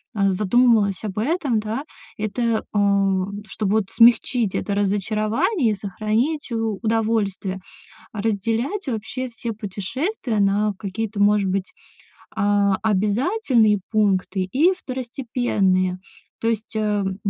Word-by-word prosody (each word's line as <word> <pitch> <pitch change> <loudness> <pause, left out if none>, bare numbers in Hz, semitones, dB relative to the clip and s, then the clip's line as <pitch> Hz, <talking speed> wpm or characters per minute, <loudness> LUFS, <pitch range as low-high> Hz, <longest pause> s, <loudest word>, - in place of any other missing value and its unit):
э, 195 -2 +2
задумалась 210 0 +3
об 205 -2 -5
этом, 270 0 0
да. 220 +6 -3 0.3
Это, 220 +2 -1
а, 200 -2 +2 0.2
чтобы, 210 -3 -2
вот, 215 -3 +1
смягчить 235 -2 +4
это 200 - -1
разочарование 215 - +1
и - - +1
сохранить 215 - -2
у 225 -3 -1
удовольствие- 215 -4 0 0.5
разделять 225 - -1
вообще 255 +2 -3
все 235 -1 -5
путешествия 220 - -3
на 205 +1 +2
какие-то, 210 +1 -4
может 205 -1 +3
быть, 190 0 -2 0.6
а, 205 -2 +2
обязательные 220 - +2
пункты 195 -3 +1
и 315 - +4
второстепенные. 235 - -1 0.4
То 225 - 0
есть, 220 0 -4
эм, 205 -3 0
215 Hz, 110 wpm, -22 LUFS, 200-235 Hz, 0.6 s, смягчить